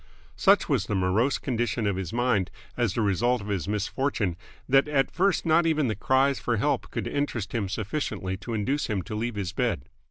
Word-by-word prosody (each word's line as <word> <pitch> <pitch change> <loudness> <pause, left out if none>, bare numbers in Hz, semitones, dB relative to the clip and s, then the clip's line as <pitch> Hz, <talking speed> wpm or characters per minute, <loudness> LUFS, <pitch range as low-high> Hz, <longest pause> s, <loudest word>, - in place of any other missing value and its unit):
Such - - +4
was - - +1
the 105 - -1
morose 95 +9 +2
condition 120 -3 -1
of 100 -2 +1
his 95 -2 -4
mind 115 -6 +1 0.3
as 120 -5 0
the 115 - +1
result 120 +5 +2
of 100 0 -8
his 95 -4 -2
misfortune 105 -1 -1 0.3
that 135 +2 +4
at 140 -2 +1
first 190 +1 +1
not 165 +1 +4
even 155 -5 +2
the 110 - -1
cries 130 +5 +2
for 120 -2 0
help 105 - 0
could - - -3
interest 130 -7 -2
him 105 -5 -1
sufficiently 105 -3 -3
to 115 +3 -5
induce 135 +8 0
him 100 -4 -1
to 110 - -7
leave 115 +2 -2
his 95 -4 -3
bed. 65 - -1
115 Hz, 200 wpm, -27 LUFS, 100-135 Hz, 0.3 s, Such